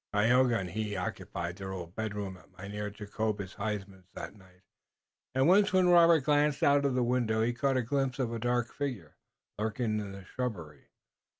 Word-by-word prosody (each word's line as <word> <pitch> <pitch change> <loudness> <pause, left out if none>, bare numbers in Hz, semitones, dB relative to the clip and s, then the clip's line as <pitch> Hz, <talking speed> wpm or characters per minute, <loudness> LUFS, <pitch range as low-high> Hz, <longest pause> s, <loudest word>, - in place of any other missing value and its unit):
Tayoga 120 +3 +4
and 90 -4 -4
he 105 +1 -3
occupied 85 -1 -4
their 95 -1 -6
old 90 -2 -7
bedroom 105 -3 -4
at 90 - -18
Mynheer 105 +2 -5
Jacobus 105 -1 -4
Huysman's 100 -3 -5
that - - -6
night, 95 -2 -21 0.7
and 130 +2 +4
once 200 +3 +5
when 185 -1 +4
Robert 170 -3 +6
glanced 145 0 +2
out 140 0 +4
of 135 -2 +1
the 125 - +2
window 120 -3 +1
he 120 +1 +1
caught 135 +2 +1
a 125 - +1
glimpse 135 +1 -1
of 125 -4 -1
a 115 - -3
dark 120 0 0
figure 125 - -4 0.4
lurking 110 0 -1
in 100 -2 -5
the 95 -1 -10
shrubbery. 90 - -5
110 Hz, 180 wpm, -30 LUFS, 100-130 Hz, 0.7 s, Robert